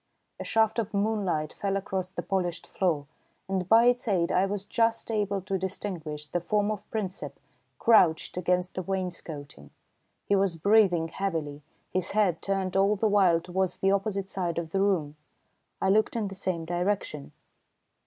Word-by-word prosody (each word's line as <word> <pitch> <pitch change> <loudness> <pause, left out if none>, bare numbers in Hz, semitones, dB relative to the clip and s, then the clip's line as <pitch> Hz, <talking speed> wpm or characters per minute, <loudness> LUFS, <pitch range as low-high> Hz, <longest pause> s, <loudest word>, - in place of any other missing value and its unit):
A - - -4
shaft 220 0 +2
of 220 -2 -3
moonlight 200 -7 0
fell 195 -1 -1
across 190 -2 -3
the 175 -2 -5
polished 175 -1 -2
floor, 165 -7 0 0.4
and 190 -2 -2
by 230 +1 +7
its 245 0 +2
aid 180 -5 +1
I 190 +2 +3
was 200 0 -3
just 230 +1 0
able 205 -2 0
to 195 -1 -2
distinguish 175 -5 -5
the 175 +4 -2
form 210 +3 +1
of 210 -2 -6
Princep 190 - -4 0.4
crouched 180 - +4
against 180 0 0
the 185 - -3
wainscoting. 170 - -5 0.6
He 200 - +2
was 195 -3 +2
breathing 180 -2 +3
heavily, 160 -7 -3 0.3
his 185 0 -1
head 200 -6 +2
turned 190 -1 -1
all 195 +2 +4
the 220 +2 +1
while 190 -5 +4
towards 185 +1 -1
the 195 - +2
opposite 195 -1 -1
side 180 -4 -3
of 165 -2 -3
the 195 - +1
room. 165 -7 +1 0.6
I 190 - +1
looked 215 +4 +3
in 215 -4 -1
the - - -8
same 185 -3 -2
direction. 175 -4 -2
190 Hz, 165 wpm, -28 LUFS, 175-205 Hz, 0.6 s, by